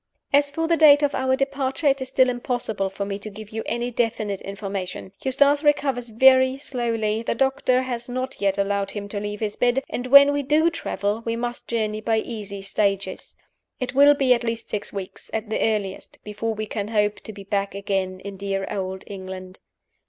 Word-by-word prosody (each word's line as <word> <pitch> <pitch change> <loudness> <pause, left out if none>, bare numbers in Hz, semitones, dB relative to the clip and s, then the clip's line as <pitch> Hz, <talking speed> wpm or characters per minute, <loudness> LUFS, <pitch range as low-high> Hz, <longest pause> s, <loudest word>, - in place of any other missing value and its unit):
"As 285 0 +4
for 325 +3 -2
the 335 - +3
date 295 -1 +7
of 290 - +2
our 260 0 +1
departure, 275 +2 -2
it 275 -1 +3
is 260 - -4
still 260 0 +4
impossible 245 -5 -2
for 195 +1 -4
me 200 0 -4
to 215 - -7
give 215 +1 -11
you 220 0 -3
any 240 +1 -2
definite 225 -4 -1
information. 195 -2 -5
Eustace 285 +3 +3
recovers 275 -5 +1
very 260 +3 +5
slowly; 230 -5 -1
the 230 - -2
doctor 265 -1 +2
has 240 -1 -4
not 255 0 -4
yet 195 -1 +1
allowed 200 0 0
him 205 0 -5
to 205 - -3
leave 205 +1 -5
his 210 -1 -2
bed; 245 +2 +1
and 245 - -4
when 280 +2 +8
we 285 - 0
do 305 +4 +3
travel 210 -9 -2
we 230 0 -2
must 240 +1 -4
journey 215 -2 -1
by 225 0 +1
easy 210 -3 -5
stages. 195 -1 -1 0.4
It 255 -1 -3
will 285 +2 +7
be 265 -3 +4
at 240 - -1
least 230 -1 -4
six 210 - -3
weeks, 195 -2 -7
at 220 0 -4
the - - 0
earliest, 205 -3 -2
before 220 +2 -3
we 215 0 -3
can 205 -1 -4
hope 210 -1 +1
to - - -9
be 200 -1 -10
back 200 0 -2
again 195 -2 -2
in 200 0 -8
dear 195 0 -2
Old 190 -2 -4
England. 185 -1 -8
225 Hz, 200 wpm, -23 LUFS, 200-260 Hz, 0.4 s, when